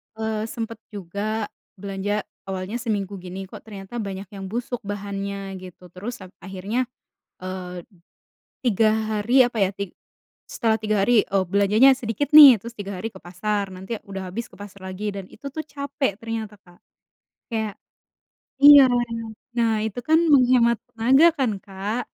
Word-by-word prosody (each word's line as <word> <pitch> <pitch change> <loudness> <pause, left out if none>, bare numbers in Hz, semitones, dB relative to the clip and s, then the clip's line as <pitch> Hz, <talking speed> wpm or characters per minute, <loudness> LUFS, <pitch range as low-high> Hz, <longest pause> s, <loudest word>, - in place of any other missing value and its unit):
eee, 220 0 -2
sempet 230 -1 -5 0.2
juga 205 +3 -3 0.2
belanja, 200 +1 -3 0.2
awalnya 190 +4 -4
seminggu 205 -4 -2
gini, 185 +2 -7
kok, 190 - -10
ternyata 205 +2 -7
banyak 195 -2 -5
yang 195 -2 -7
busuk, 240 +4 -3
bahannya 200 -1 -5
gitu, 180 -1 -13
terus 205 +4 -7
ap 185 - -13
akhirnya, 195 +7 -3 0.6
eee, 180 -1 -6 0.8
3 225 -2 +3 0.2
hari 230 +5 +4
apa, 240 - -8
ya. 195 -2 +3
Tig 200 -2 -5 0.6
setelah 225 -1 0
3 215 -2 +1
hari, 235 -1 +4
oh, 190 - +4
belanjanya 205 +7 +5
sedikit, 235 +6 -2
nih, 290 -4 +11
terus 235 +4 -10
3 200 -1 -5
hari 225 +3 -4
ke 190 - -13
pasar, 200 +3 -2
nanti 190 +4 -6
udah 190 -2 -6
habis, 235 +4 -4
ke - - -19
pasar 200 -2 -10
lagi, 200 +3 -4
dan 195 -2 -7
itu, 280 - -10
tuh, 315 +3 -4
capek 280 -6 -2
ternyata, 225 -2 -5
Kak, 175 -1 -20 0.7
kayak 220 -3 -2 0.9
iya, 285 -2 +10 0.7
nah, 225 -2 +2
itu 220 +2 -3
kan, 320 +4 +4
menghemat 250 -4 +5 0.2
tenaga 260 +8 +5
kan, 265 -4 +1
Kak. 205 +5 -4
210 Hz, 150 wpm, -23 LUFS, 195-235 Hz, 0.9 s, nih